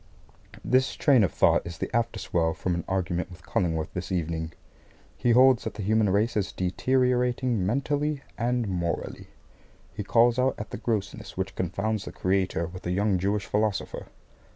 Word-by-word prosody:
This 130 +1 +2
train 135 -7 +4
of 95 - +1
thought - - +3
is 85 -1 -7
the - - -4
after 115 0 0
swell 80 -1 0
from 90 - -1
an 85 -1 -2
argument 90 -2 -1
with 90 0 -13
Cullingworth 80 -5 -1
this 90 +1 -5
evening. 80 -2 -2 0.6
He 120 - 0
holds 130 +1 +6
that - - -5
the 105 - -5
human 110 +1 +2
race 105 +5 +1
is 105 -3 0
deteriorating 125 +3 +1
mentally 145 +6 -1
and 120 -1 0
morally. 85 -3 -3 0.7
He 105 - -4
calls 120 +3 +3
out 130 +1 +2
at 105 - -7
the - - -4
grossness 105 -4 -3
which 95 0 -2
confounds 100 +4 -2
the - - -6
Creator 95 -3 0
with 90 +1 -8
a - - -1
young 100 0 +1
Jewish 100 +2 0
Philosopher. 105 -1 -1
105 Hz, 170 wpm, -27 LUFS, 90-120 Hz, 0.7 s, holds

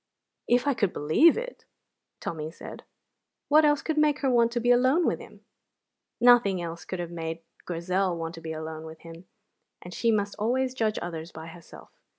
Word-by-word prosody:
"If 245 +2 +3
I 285 - +2
could 205 -7 0
believe 160 - +4
it!" - - -6 0.6
Tommy 155 -2 -5
said. 165 - -10 0.7
"What 305 +1 +6
else 295 -1 +2
could 315 -1 -1
make 300 -1 +2
her 270 -2 +2
want 235 -1 +3
to 240 - 0
be 245 +1 +2
alone 260 +8 +4
with - - 0
him?" - - -14 0.8
Nothing 240 -6 +5
else 170 -1 -6
could 185 - -5
have 175 -1 -5
made 165 -1 -5 0.2
Grizel 180 +1 -1
want 165 0 -5
to 165 - -10
be 160 0 -6
alone 160 0 -6
with 160 0 -11
him, 165 +1 -12 0.5
and 180 - -10
she 230 - 0
must 205 -2 0
always 255 +4 0
judge 220 -4 -1
others 165 -1 -6
by 160 0 -9
herself. 165 0 -13
190 Hz, 185 wpm, -27 LUFS, 165-250 Hz, 0.8 s, What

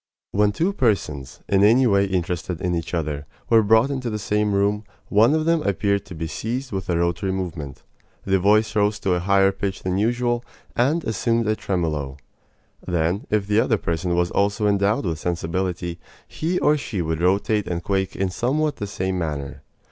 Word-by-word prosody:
When 105 0 +3
two 170 - 0
persons, 75 - -1
in 100 0 +3
any 120 +5 +5
way 100 -3 +3
interested 90 -2 -2
in 90 -1 -1
each 85 +1 -2
other, 75 -3 -3 0.2
were 115 -1 +7
brought 110 +5 +4
into 130 -3 -2
the 105 - -2
same 105 0 0
room, 100 +2 +1 0.3
one 115 +8 +5
of 155 0 0
them 165 -1 +2
appeared 100 - 0
to 90 - -8
be 80 +1 -4
seized 125 - -4
with 95 -2 -4
a 85 - +2
rotary 85 +3 0
movement. 85 -8 -5 0.4
The 95 0 +2
voice 105 +4 +3
rose 105 0 +2
to 95 - +1
a 90 - +1
higher 95 +1 +3
pitch 95 0 -4
than 95 +1 0
usual, 120 +2 0 0.3
and 150 +7 +2
assumed 115 +1 0
a 110 - +2
tremolo. 75 -9 -2 0.7
Then, 90 +2 -1
if 105 -2 +1
the 105 +2 +2
other 115 -1 +2
person 85 0 -1
was 90 0 +1
also 100 +2 +1
endowed 100 +1 +2
with 80 -3 -2
sensibility, 85 +1 -2 0.3
he 170 +3 -2
or 150 -3 +3
she 105 -10 -3
would 80 0 -2
rotate 100 +3 +1
and 85 -1 -3
quake 95 0 -1
in 95 -1 -1
somewhat 145 +9 0
the 105 - -4
same 95 -2 -2
manner. 75 -5 -4
100 Hz, 185 wpm, -23 LUFS, 85-110 Hz, 0.7 s, were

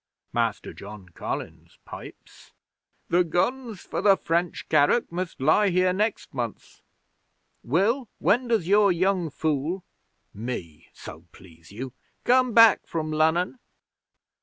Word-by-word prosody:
'Master - - -1
John 100 -2 -11
Collins 85 - -7
pipes: - - -12 0.6
"The 180 +1 +4
guns 220 +5 -2
for - - -4
the 195 -2 +5
French 170 +1 -2
carrack 155 +10 +3
must 175 0 -4
lie 155 +9 +3
here 185 0 +2
next 210 +3 -2
month. 120 -5 -6 0.8
Will, 205 - +1
when 245 +4 +2
does 220 -8 +1
your 200 0 +5
young 180 -1 +1
fool" 155 +5 -2 0.5
(me, 100 -8 -7
so 80 +3 -11
please 85 -2 -17
you!) 125 +5 -7 0.3
"come 255 0 +3
back 230 0 +6
from 155 -2 -3
Lunnon?" 160 +8 +1
175 Hz, 120 wpm, -25 LUFS, 135-205 Hz, 0.8 s, back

